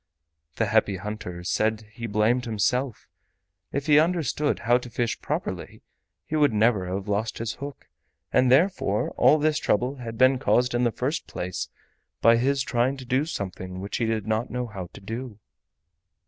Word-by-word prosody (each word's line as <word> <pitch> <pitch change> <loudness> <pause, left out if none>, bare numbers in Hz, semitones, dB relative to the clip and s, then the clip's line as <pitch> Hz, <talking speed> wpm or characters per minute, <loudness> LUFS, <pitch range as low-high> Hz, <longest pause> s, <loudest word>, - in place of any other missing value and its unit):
The - - +1
Happy 100 - +2
Hunter 90 -2 -6
said 110 +3 0
he 115 +1 -5
blamed 110 +4 +2
himself; 120 +3 -1 0.7
if 140 0 -2
he 150 -2 +5
had 155 - +7
understood 155 -4 0
how 120 +1 +3
to 125 - -9
fish 120 0 -2
properly - - -4 0.4
he 155 - -3
would 145 -5 +4
never 105 -3 +2
have 95 +2 -3
lost 105 +2 -1
his 115 -1 -3
hook, 140 0 -7 0.5
and 130 -1 +4
therefore 135 - +2
all 155 - +5
this 155 0 +1
trouble 125 +2 0
had 115 -3 -7
been 130 +1 +5
caused 125 -2 +2
in 120 +1 +2
the 120 - +2
first 135 +8 -2
place 90 0 -4 0.5
by 115 +1 +6
his 135 +2 +1
trying 130 +1 0
to 130 - -9
do 130 +4 +1
something 95 - -5
which 100 +2 -4
he 120 - 0
did 110 -2 -1
not 110 +2 -1
know 125 +1 -2
how 100 -6 -7
to - - -11
do. 115 +2 -6
120 Hz, 175 wpm, -26 LUFS, 105-130 Hz, 0.7 s, had